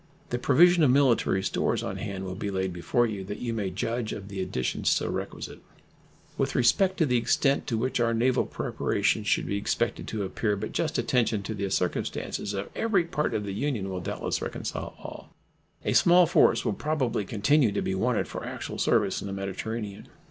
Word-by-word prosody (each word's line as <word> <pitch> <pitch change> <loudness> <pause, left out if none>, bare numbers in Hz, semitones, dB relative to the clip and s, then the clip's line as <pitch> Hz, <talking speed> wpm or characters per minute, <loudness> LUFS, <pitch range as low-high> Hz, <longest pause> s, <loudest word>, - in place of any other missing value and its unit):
The 120 - -1
provision 170 +7 +5
of 150 - +5
military 125 -7 +3
stores - - 0
on - - -4
hand 95 -1 -5
will 95 - -4
be 100 +2 -4
laid 95 -1 -2
before 90 +8 +1
you, 105 -4 -4
that 105 +2 -5
you 120 -2 -3
may 105 -4 -2
judge 115 +5 -2
of 100 0 -7
the 100 -1 -4
additions 65 -8 -1
still - - +1
requisite. - - -5 0.8
With 135 0 0
respect 190 +10 +3
to 165 - +3
the 125 -3 +2
extent 135 +4 +1
to 115 - 0
which 125 +3 -1
our 115 -1 +2
naval 120 +3 +2
preparations - - -1
should - - +2
be 100 - -1
expected 100 - -1
to 110 -2 -3
appear, 105 +2 -1
but 100 - -5
just - - -1
attention 115 -4 +1
to 110 - -4
the 100 -2 -3
circumstances 95 +2 -2
of 100 +1 -4
every 205 -6 +2
part 150 -3 -2
of 105 - -1
the 100 -1 -4
Union 105 -4 -2
will 90 -1 -4
doubtless - - -3
reconcile - - -5
all. - - -10 0.6
A - - +1
small 175 +1 +6
force 170 -1 +4
will - - +1
probably 145 -8 -1
continue 115 +5 +2
to 100 - -1
be 95 - -1
wanted 115 +4 0
for - - -6
actual - - -6
service - - +2
in - - -5
the 95 - -4
Mediterranean. 100 +2 -5
110 Hz, 200 wpm, -27 LUFS, 100-130 Hz, 0.8 s, small